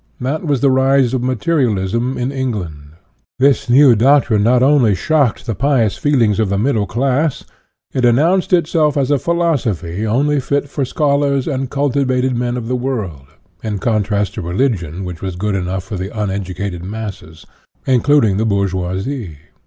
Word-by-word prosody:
That 140 +7 -3
was 140 -4 0
the 140 -1 +4
rise 130 -1 +2
of 130 - 0
materialism 125 - 0
in 125 +2 -2
England. 90 - -5 0.4
This 135 -1 +2
new 130 0 +6
doctrine 125 -2 +3
not 125 +4 +3
only 130 -7 +4
shocked 140 - 0
the 115 - -2
pious 120 -3 +1
feelings 120 -8 +1
of 110 -3 +1
the 100 - 0
middle 110 -2 0
class; 135 - 0 0.5
it 130 - -1
an 120 -1 +4
nounced 175 +7 +1
itself 160 -4 +2
as 140 0 +1
a 145 - +2
philosophy 115 - -1
only 140 +6 +1
fit 140 +2 -1
for 140 -1 -3
schol 140 +1 +1
ars 140 -2 0
and 135 -4 -2
cultivated 130 -2 0
men 120 +1 -2
of 115 -2 -5
the 125 - -1
world, 110 - -4 0.4
in 105 -2 -3
contrast 105 -2 -1
to - - -5
religion 90 - -2
which 90 -2 -7
was 95 -2 -4
good 105 +3 -2
enough 95 0 -2
for 95 +1 -6
the 95 +2 -4
un 105 -2 -1
educated 95 -2 -5
masses, 100 -5 -8 0.4
including 130 -5 +3
the 110 - 0
bourgeoisie. 95 - -2
120 Hz, 170 wpm, -17 LUFS, 100-140 Hz, 0.5 s, new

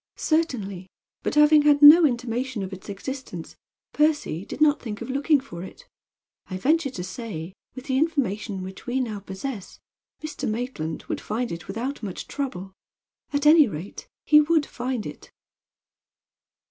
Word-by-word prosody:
"Certainly; 215 - -1 0.3
but - - -2
having 300 0 +6
had 290 0 +4
no 310 +2 +10
intimation 245 -2 -3
of 190 0 -6
its 190 +2 -10
existence 200 -4 -7 0.4
Percy 295 - +1
did - - -8
not 300 -1 +4
think 215 -3 -6
of - - -5
looking 285 +2 +3
for 175 -11 -9
it. 480 - -11 0.6
I 185 - -4
venture 300 - +2
to 185 -8 -6
say, 185 -3 -6 0.2
with 255 0 -9
the 265 -1 +1
information 215 - -1
which 190 +4 -10
we 250 +2 0
now 220 -5 -3
possess, 200 +2 -7 0.4
Mr. 310 -6 -4
Maitland 215 -9 -4
would - - -4
find 235 +3 -3
it 170 0 -7
without 240 +8 -4
much 195 -5 -6
trouble. 195 -10 -5 0.6
At 285 0 -1
any 305 -2 +7
rate 180 0 -8 0.2
he 300 0 +7
would 310 0 +2
find 245 -2 -4
it." - - -9
250 Hz, 155 wpm, -25 LUFS, 195-290 Hz, 0.6 s, no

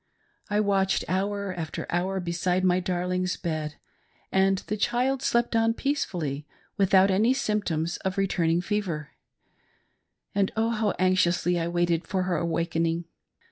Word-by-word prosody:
I 205 0 +1
watched 195 -2 +1
hour 200 +1 -1
after 165 -3 -5
hour 185 +2 0
beside 180 +1 0
my 180 0 +3
darling's 180 0 -1
bed, 155 -3 -3 0.6
and 190 0 +3
the 210 - -2
child 250 +5 +1
slept 235 -1 +1
on 225 0 +3
peacefully, 170 - -2 0.3
without 195 -1 +4
any 220 +7 +3
symptoms 195 - -1
of 190 0 -3
return 190 -4 +1
ing 170 +1 +2
fever; 175 -6 -2 1.2
and. 200 -1 +1
Oh, 225 +1 +2
how 215 -3 0
anxiously 180 -1 +2
I 165 - -1
waited 175 -1 0
for 185 -1 0
her 180 -2 0
awaking. 165 0 -1
185 Hz, 140 wpm, -26 LUFS, 170-200 Hz, 1.2 s, without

